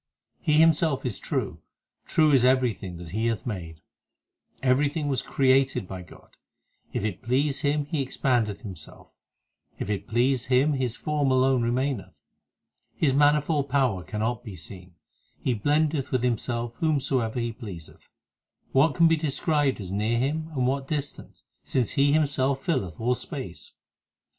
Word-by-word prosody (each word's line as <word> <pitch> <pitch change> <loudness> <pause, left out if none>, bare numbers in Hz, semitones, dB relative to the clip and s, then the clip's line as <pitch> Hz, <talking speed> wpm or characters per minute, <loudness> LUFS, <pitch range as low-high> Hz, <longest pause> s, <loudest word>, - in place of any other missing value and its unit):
5 - - -31
He 150 - +4
Himself 160 -2 +4
is 120 -6 -2
true; - - -3 0.5
true 155 -1 +4
is 135 -4 +5
everything 125 -8 +1
that 85 -1 -9
He 110 +6 -1
hath 115 -5 -2
made: 85 -8 -6 0.8
Everything 145 +4 +2
was 135 - 0
created 135 -6 +2
by 95 -1 -6
God. 90 - -16 0.5
If - - -2
it 105 -5 -3
please 135 +4 +1
Him 145 0 +1
He 145 0 -2
expandeth 120 -5 0
Himself, 95 -5 -10 0.7
If 105 - -3
it 100 -2 -3
please 120 +2 +1
Him 135 +4 +3
His 125 -4 -1
form 150 -1 0
alone 130 -1 +3
remaineth. 125 -1 -1 0.8
His 140 -4 +2
manifold 145 0 +3
power 130 -9 +1
cannot 110 +4 -2
be 105 -5 -8
seen; 90 +2 -10 0.4
He 130 - -1
blendeth 145 +4 +1
with 130 -3 0
Himself 120 0 -1
whomsoever 135 -7 0
He 115 -1 -2
pleaseth. 100 -10 -10 0.6
What 140 +3 +3
can 170 -1 +6
be 165 - +4
described 145 -2 0
as 95 -3 -6
near 105 +4 0
Him 155 +6 -1
and 130 -2 +1
what 135 +1 -1
distant, 145 -1 -5 0.2
Since 125 -4 0
He 140 0 +3
Himself 140 -3 +1
filleth 95 - -1
all 120 +2 +2
space 130 - -7
130 Hz, 150 wpm, -26 LUFS, 115-145 Hz, 0.8 s, can